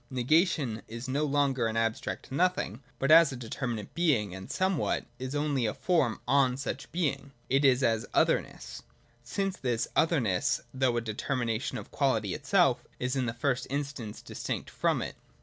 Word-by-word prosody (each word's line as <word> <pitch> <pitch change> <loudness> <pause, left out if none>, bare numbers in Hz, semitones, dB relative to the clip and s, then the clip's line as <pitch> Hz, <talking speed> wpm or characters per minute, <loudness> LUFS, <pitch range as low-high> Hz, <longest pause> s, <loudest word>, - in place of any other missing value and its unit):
[ - - -37
Negation 130 - +1
is 115 +3 -7
no 140 +4 0
longer 140 -4 +1
an 110 0 -2
abstract 115 +2 -2
nothing, 140 - 0 0.2
but, 135 +3 +1
as 165 -2 +8
a - - -5
determinate 120 -2 -4
being 130 - +1
and 95 0 -8
somewhat, 185 -4 0
is 130 +2 -4
only 145 -5 +1
a 105 - -2
form 160 -11 +1
on 135 -2 +3
such 140 -1 -5
being 140 -4 -2
— - - -36
it 135 +2 +3
is 135 -1 +4
as 115 -2 +1
Other - - +3
nessj - - -10 0.4
Since 190 +11 -2
this 120 -2 -1
otherness, 125 - +2
though 130 -2 +1
a - - +1
determination 115 +2 -2
of 105 - -9
Quality 110 -9 +1
itself, - - +2 0.2
is 125 +1 -1
in 130 -2 0
the 115 - -2
first 125 +1 0
instance 140 -6 -4
distinct - - -5
from - - +1
it. - - -5
130 Hz, 175 wpm, -29 LUFS, 115-145 Hz, 0.4 s, as